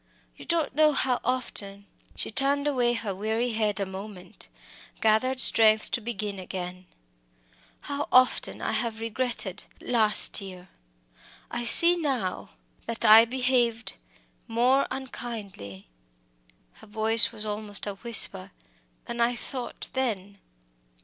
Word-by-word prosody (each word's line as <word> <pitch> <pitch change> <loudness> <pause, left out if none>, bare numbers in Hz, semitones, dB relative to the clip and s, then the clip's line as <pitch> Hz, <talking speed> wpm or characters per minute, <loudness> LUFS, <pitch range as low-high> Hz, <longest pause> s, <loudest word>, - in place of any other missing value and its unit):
You - - -14
don't 330 -3 -2
know 305 +1 +2
how 260 -2 -1
often 200 -6 -4 0.2
" - - -34
She - - -7
turned 280 +4 +1
away 250 -5 0
her 225 -4 -5
weary 220 +5 -3
head 215 -2 -2
a 200 - -2
moment 190 -1 -11 0.5
gathered 225 +4 0
strength 220 -3 +6
to 235 - -2
begin 210 -3 -6
again 185 0 -8 0.5
" - - -38 0.3
how 285 +1 -5
often 255 0 +1
I - - -2
have 230 -2 -3
regretted 225 -4 -5
last 220 -5 +3
year. 185 -2 -12 0.8
I 240 - -4
see 340 +9 +7
now 265 - -4 0.4
that 230 0 -4
I 220 +1 +7
behaved 240 -4 -2 0.5
more 250 +4 +1
unkindly" 205 - -9 0.9
her - - -16
voice 220 +2 +5
was 215 -2 -7
almost 210 -1 -5
a 205 - -5
whisper 195 - +3 0.6
"than 235 0 -6
I 240 +1 0
thought 250 +1 -6
then. 205 -7 -4
225 Hz, 130 wpm, -25 LUFS, 200-250 Hz, 0.9 s, see